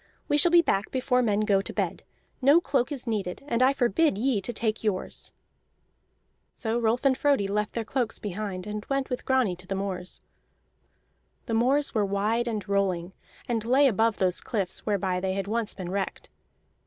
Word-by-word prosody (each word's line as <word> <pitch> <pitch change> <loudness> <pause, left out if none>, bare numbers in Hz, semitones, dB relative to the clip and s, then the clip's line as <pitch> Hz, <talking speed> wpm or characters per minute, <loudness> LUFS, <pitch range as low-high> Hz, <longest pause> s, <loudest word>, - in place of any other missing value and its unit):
We - - +2
shall 345 - +8
be 340 0 +6
back 195 -8 0
before 255 -1 +1
men 210 -3 +1
go 200 -2 +2
to - - -6
bed. - - -2 0.4
No 285 +6 +6
cloak 270 -6 0
is 270 -4 -3
needed, 210 -3 -3
and 235 -4 0
I 260 +1 +6
forbid 275 0 +2
ye 235 -2 +1
to 240 - -3
take 220 -1 -2
yours." 205 -4 -3 1.2
So 230 0 -2
Rolf 235 +3 0
and 270 -1 +5
Frodi 275 -8 +2
left 210 +1 -1
their 230 - -1
cloaks 240 -1 -1
behind, 195 -2 -5
and 210 0 -5
went 275 -1 -1
with 250 - -3
Grani 255 -8 +2
to 180 +1 -6
the 195 - -2
moors. 190 -2 -3 1.3
The 225 - -4
moors 265 +6 +2
were 215 -3 +2
wide 210 +4 0
and 215 -3 -3
rolling, 190 -3 0 0.3
and 230 -3 -1
lay 265 +5 +4
above 225 -1 +2
those 185 -2 +1
cliffs 195 -4 -3
whereby 190 -3 0
they 190 0 -1
had 195 0 -2
once 220 +1 -1
been 180 -2 -6
wrecked. 195 0 -4
220 Hz, 185 wpm, -27 LUFS, 195-255 Hz, 1.3 s, shall